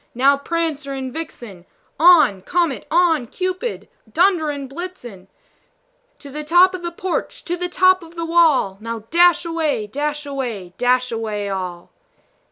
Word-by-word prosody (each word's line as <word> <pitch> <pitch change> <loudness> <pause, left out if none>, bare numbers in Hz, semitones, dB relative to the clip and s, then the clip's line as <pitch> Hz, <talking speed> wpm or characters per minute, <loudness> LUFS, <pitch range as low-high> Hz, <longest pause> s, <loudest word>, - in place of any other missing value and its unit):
now, 275 +3 +4
Prancer 300 -1 -3
and 260 -2 -5
Vixen! 240 - -8 0.4
On! 310 - +6
Comet, 335 - -1
on! 325 -6 +2
Cupid, 370 - -3 0.2
on! - - -23
Dunder 345 - +2
and 285 -2 -5
Blitzen 265 - -9 0.9
To 280 - -12
the 300 +2 -5
top 350 +4 +5
of 370 - -5
the 345 - -3
porch, 360 +2 -4
to 350 - -1
the 355 0 -3
top 370 +1 +4
of 335 0 -14
the 335 -1 -3
wall! 320 - +3
Now, 230 -1 -5
dash 345 0 +4
away, 320 -9 -1
dash 295 +6 -3
away, 240 -10 -5
dash 250 0 +2
away 215 -3 -3
all!" 180 -3 -5
295 Hz, 155 wpm, -20 LUFS, 240-345 Hz, 0.9 s, On